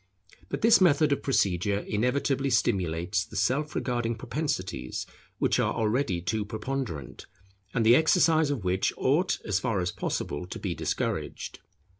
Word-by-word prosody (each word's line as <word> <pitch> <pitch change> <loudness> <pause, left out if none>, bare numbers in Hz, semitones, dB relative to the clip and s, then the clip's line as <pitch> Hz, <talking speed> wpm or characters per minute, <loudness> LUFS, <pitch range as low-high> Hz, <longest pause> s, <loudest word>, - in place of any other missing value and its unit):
But - - -3
this 225 -3 +6
method 155 -4 +4
of 140 - +1
procedure 100 -5 +1
inevitably 135 +5 0
stimulates 95 -3 +1
the 105 - -13
self 130 +9 0
regarding 120 -2 -1
propensities, 95 - -3 0.3
which - - +1
are - - +1
already 110 -4 0
too 105 +5 -1
preponderant, 110 - -5 0.4
and 115 -2 0
the 115 +2 +7
exercise 160 0 +4
of 135 -8 -2
which 90 +1 +1
ought 155 +8 +2
as 100 -3 +1
far 115 -6 -1
as 90 0 -1
possible 75 +5 -3
to - - -6
be - - -3
discouraged. - - -3
115 Hz, 145 wpm, -28 LUFS, 95-140 Hz, 0.4 s, the